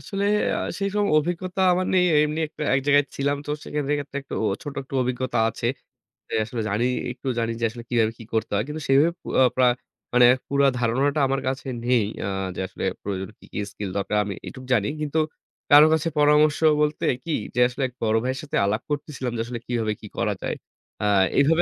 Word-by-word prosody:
আসলে 200 Hz, 0 st, -3 dB, 0.3 s
আ -, -, -2 dB, 0.2 s
সেইসব 200 Hz, +1 st, 0 dB
অভিজ্ঞতা 180 Hz, +4 st, -2 dB
আমার 185 Hz, +1 st, 0 dB
নেই। 180 Hz, -1 st, +5 dB, 0.2 s
এমনি 150 Hz, +1 st, -2 dB
একটা 155 Hz, -, -8 dB
এক 135 Hz, -, +3 dB
জায়গায় 145 Hz, 0 st, +5 dB
ছিলাম 140 Hz, +1 st, 0 dB
তো -, -, -4 dB
সে -, -, -9 dB
ক্ষেন 150 Hz, -2 st, -1 dB
ক্ষেত্রে 140 Hz, 0 st, -6 dB
ও -, -, -4 dB
একটু 135 Hz, -, -7 dB, 0.3 s
ছোট 145 Hz, -, -6 dB
একটু 135 Hz, -, -11 dB
অভিজ্ঞতা 125 Hz, 0 st, -1 dB
আছে। 115 Hz, +1 st, -4 dB, 0.6 s
যে -, -, -8 dB
আসলে 115 Hz, 0 st, -4 dB
জানি 105 Hz, +5 st, +1 dB, 0.3 s
একটু 130 Hz, +2 st, -9 dB
জানি 115 Hz, 0 st, 0 dB
যে -, -, +3 dB
আসলে 120 Hz, +1 st, -9 dB
কিভাবে 115 Hz, -2 st, +2 dB
কি 115 Hz, -, -8 dB
করতে 110 Hz, -, -1 dB
হয়। 100 Hz, -, +1 dB
কিন্তু 155 Hz, +1 st, -5 dB
সেইভাবে 140 Hz, +5 st, +4 dB, 0.3 s
আ -, -, +8 dB
প্রায় 125 Hz, -1 st, +4 dB, 0.4 s
মানে 125 Hz, 0 st, +7 dB, 0.2 s
পুরা 140 Hz, 0 st, +3 dB
ধারণাটা 135 Hz, +5 st, +1 dB
আমার 135 Hz, 0 st, 0 dB
কাছে 130 Hz, +1 st, -2 dB, 0.2 s
নেই। 125 Hz, -3 st, +3 dB, 0.2 s
অ্যা -, -, -2 dB, 0.3 s
যে -, -, -6 dB
আসলে -, -, -8 dB, 0.2 s
প্রয়োজন 95 Hz, -1 st, -4 dB
কি, -, -, -16 dB
কি -, -, -3 dB
skill 100 Hz, -2 st, -5 dB
দরকার 105 Hz, +1 st, -1 dB
আমি 100 Hz, -, -3 dB
এইটুক 130 Hz, -2 st, -9 dB
জানি। 105 Hz, -4 st, +2 dB
কিন্তু 150 Hz, +1 st, 0 dB, 0.5 s
কারো 145 Hz, +1 st, +10 dB
কাছে 160 Hz, +1 st, +1 dB
পরামর্শ 150 Hz, 0 st, +4 dB, 0.2 s
বলতে 150 Hz, 0 st, 0 dB, 0.2 s
কি 165 Hz, -, -4 dB, 0.2 s
যে -, -, 0 dB
আসলে 125 Hz, +2 st, -4 dB
এক 125 Hz, -, -15 dB
বড় 110 Hz, 0 st, +2 dB
ভাইয়ের 130 Hz, +1 st, -2 dB
সাথে 145 Hz, -, -5 dB
আলাপ 105 Hz, +4 st, 0 dB
করতেছিলাম 145 Hz, -4 st, -3 dB
যে -, -, -1 dB
আসলে 120 Hz, 0 st, -5 dB
কিভাবে 115 Hz, -3 st, 0 dB
কি -, -, -8 dB
করা -, -, +1 dB
যায়। -, -, -2 dB, 0.5 s
অ্যা 105 Hz, -, +1 dB, 0.3 s
এইভাবে 160 Hz, +5 st, +4 dB
135 Hz, 210 wpm, -24 LUFS, 115-150 Hz, 0.6 s, কারো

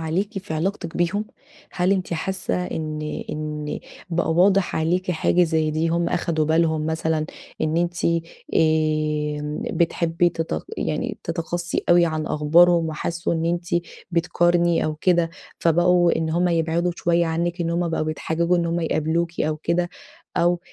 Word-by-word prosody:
عليكِ 190 Hz, +7 st, -2 dB
في 185 Hz, -4 st, -6 dB
علاقتِك 170 Hz, 0 st, -2 dB
بيهم؟ 185 Hz, +5 st, 0 dB, 0.5 s
هل 180 Hz, +2 st, +2 dB
أنتِ 185 Hz, -3 st, -1 dB
حاسّة 180 Hz, +1 st, -2 dB
إن 155 Hz, -1 st, -4 dB, 0.3 s
إن 150 Hz, -1 st, -4 dB, 0.3 s
بقى 165 Hz, -1 st, +1 dB
واضح 190 Hz, +2 st, +3 dB
عليكِ 180 Hz, +3 st, 0 dB
حاجة 175 Hz, +2 st, +2 dB
زي 160 Hz, -2 st, +1 dB
دي؟ 160 Hz, +2 st, 0 dB
هم 170 Hz, +1 st, +1 dB
أخدوا 160 Hz, -2 st, 0 dB
بالهم 160 Hz, 0 st, +2 dB
مثلًا 160 Hz, -1 st, 0 dB, 0.3 s
إن 155 Hz, +1 st, 0 dB
أنتِ 175 Hz, 0 st, -1 dB, 0.5 s
آآ 155 Hz, -2 st, +1 dB
بتحبي 170 Hz, 0 st, +2 dB
تت 165 Hz, -, -3 dB
يعني -, -, -2 dB
تَتَقصِّي 170 Hz, +1 st, -2 dB
أوي 175 Hz, 0 st, +6 dB
عن 155 Hz, -1 st, -2 dB
أخبارهم، 165 Hz, +2 st, +4 dB
وحسّوا 170 Hz, +3 st, -2 dB
إن 165 Hz, 0 st, -1 dB
أنتِ 170 Hz, +1 st, -1 dB, 0.4 s
بتقارني 175 Hz, 0 st, +2 dB
أو 155 Hz, -, -1 dB
كده، 170 Hz, +1 st, +2 dB, 0.3 s
فبقوا 175 Hz, +1 st, +3 dB
إن 160 Hz, -1 st, -1 dB
هم 175 Hz, +2 st, +2 dB
يبعدوا 170 Hz, +1 st, +1 dB
شوية 170 Hz, 0 st, +2 dB
عنِّك، 170 Hz, +2 st, -1 dB
إن 170 Hz, -1 st, 0 dB
هم 170 Hz, 0 st, 0 dB
بقوا 160 Hz, -, -1 dB
بيتحججوا 165 Hz, +3 st, 0 dB
إن 170 Hz, -1 st, 0 dB
همّ 170 Hz, +1 st, -1 dB
يقابلوكِ 165 Hz, +2 st, -1 dB
أو 155 Hz, 0 st, 0 dB
كده، 175 Hz, +3 st, -1 dB, 0.5 s
أو 175 Hz, 0 st, +2 dB
170 Hz, 150 wpm, -23 LUFS, 160-175 Hz, 0.5 s, أوي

